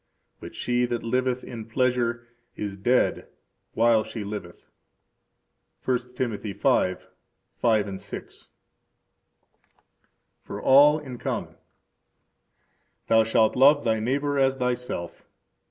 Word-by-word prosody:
But - - -10
she 125 0 0
that 120 -1 -3
liveth 125 +1 -1
in 115 -2 -8
pleasure 120 0 0 0.3
is 100 -2 -5
dead 120 +6 +1 0.5
while 115 -1 +4
she 110 -1 -6
liveth. 100 -4 -8 1.2
1 125 -1 -2
Tim. 125 -2 -1
5:5 100 +1 -2
6. - - -9 1.9
For - - -7
All 145 +3 +6
in 130 -5 -8
Common. - - -4 1.5
Thou 115 0 +5
shalt 110 0 +2
love 145 +3 +5
thy 110 -1 +1
neighbor 140 +5 -1
as 135 0 +3
thyself. 125 -8 -4
120 Hz, 100 wpm, -25 LUFS, 110-130 Hz, 1.9 s, All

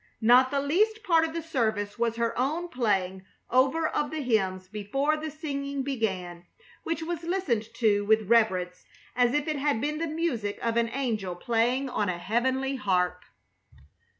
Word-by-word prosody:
Not 250 +3 +6
the 280 +1 0
least 425 +10 +1
part 325 -2 +4
of 320 - -5
the 335 - -3
service 220 -8 -1
was 230 -1 +1
her 230 0 -1
own 310 +8 -1
playing 190 - -1 0.3
over 270 +6 +3
of 295 - -1
the 315 -1 -4
hymns 190 -6 0
before 215 +10 -1
the 310 +1 -5
singing 280 -2 -4
began, 185 -10 -3 0.3
which 330 0 -3
was 340 0 -3
listened 320 - -1
to 205 -3 +2
with 215 0 +2
reverence 190 -6 +2 0.3
as 245 +1 +3
if 295 +1 0
it 305 -2 -1
had 285 -4 +1
been 300 +4 -2
the 330 - -1
music 290 -11 -2
of 230 -1 -1
an 235 0 +2
angel 225 -8 -2
playing 240 +7 0
on 210 -6 -1
a 175 - -2
heavenly 260 +7 0
harp. 180 -4 0
245 Hz, 170 wpm, -27 LUFS, 210-295 Hz, 0.3 s, Not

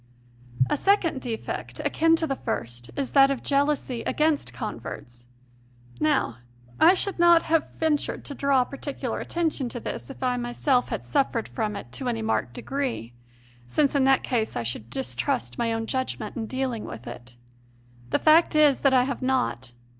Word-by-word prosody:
A - - 0
second 335 -6 +2
defect, 230 -3 -5
akin 330 0 +3
to 325 - -1
the 275 -3 -1
first, 120 +1 -3
is 275 -2 -2
that 275 -1 +6
of 275 -2 -2
jeal 280 0 +2
ousy 265 -5 -2
against 305 -1 +1
converts. 120 0 -7 0.7
Now 135 -6 +1 0.4
I 360 - +7
should 390 0 -1
not 345 -1 +6
have 325 0 +1
ventured 310 -3 0
to 285 - -5
draw 275 -2 +2
particular 275 +2 -5
attention 320 -7 -1
to 240 - -6
this - - -6
if 270 - -8
I 250 -1 +1
myself 245 +2 +1
had - - -3
suffered 230 - 0
from 215 -3 -2
it 200 - -8
to 260 -3 -2
any 225 -2 -2
marked 175 - -1
degree, 260 - -3 0.5
since 280 - +2
in 280 -2 +3
that 270 0 +4
case 230 -4 -1
I 120 - -1
should 115 -1 -4
distrust 120 -1 -2
my 230 - +1
own 225 0 -2
judg 260 +3 -2
ment - - -6
in 225 -2 -4
dealing 260 -3 -2
with 115 +1 -8
it. 120 0 -9 0.7
The - - +2
fact 315 +1 +5
is 300 -3 +5
that 275 -2 +4
I 250 - +5
have 265 0 -3
not. 245 - -1
260 Hz, 175 wpm, -26 LUFS, 215-285 Hz, 0.7 s, I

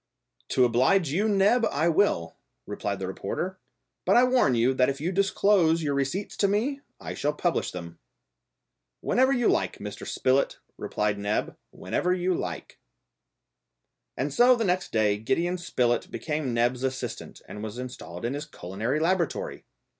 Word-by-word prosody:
"To 130 - +4
oblige 135 +9 +3
you, 205 +8 +1
Neb, 205 +4 +3
I 155 +4 +1
will," 160 - +1 0.3
replied 100 -1 -3
the 95 - -4
reporter; 175 - -4 0.4
"but - - +3
I 245 - +7
warn 250 - +3
you 120 +3 +3
that 130 0 +3
if 140 0 -3
you 165 +5 -1
disclose 190 -3 +3
your 145 -2 0
receipts 140 +9 -2
to 200 - +3
me, 245 +8 0 0.2
I - - -6
shall 150 +1 -1
publish 170 +3 0
them." 85 -2 -8 1.0
"Whenever 260 +2 +3
you 245 -4 +2
like, - - +1
Mr. 105 0 -7
Spilett," 130 +1 +1 0.2
replied 105 -1 -2
Neb; 105 +1 -1
"whenever 180 - -2
you 185 0 0
like." - - -5 1.4
And 140 +1 -2
so 250 - +6
the 230 -2 -1
next 180 -1 0
day 105 -2 +2
Gideon 170 +11 0
Spilett 120 -8 0
became 150 -4 -3
Neb's 120 +2 +1
assistant 130 0 -4
and 105 - -8
was 110 +1 -6
installed 125 -8 -7
in 120 - -1
his 145 +2 -5
culinary 110 - -3
laboratory. 185 - -1
145 Hz, 155 wpm, -27 LUFS, 120-190 Hz, 1.4 s, I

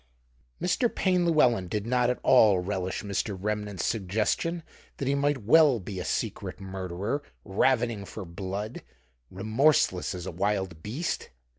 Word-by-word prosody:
Mr. 230 +7 +1
Payne 180 -4 +1
Llewelyn 125 - +3
did 105 +3 -3
not 125 0 +2
at 125 - 0
all 110 -7 +6
relish 95 +1 -3
Mr. 100 0 -2
Remnant's 105 -2 -2
suggestion 110 - -1 0.3
that 135 - -3
he 140 - +2
might 140 -3 0
well 140 +1 +6
be 95 0 -6
a 90 - -4
secret - - -3
murderer, 95 +6 -3 0.2
ravening 115 0 +1
for 105 -1 -7
blood, 95 +6 -5 0.5
remorseless 110 -1 +2
as 90 -1 -6
a - - -4
wild 95 -2 -1
beast. 125 - -3
105 Hz, 140 wpm, -28 LUFS, 95-130 Hz, 0.5 s, all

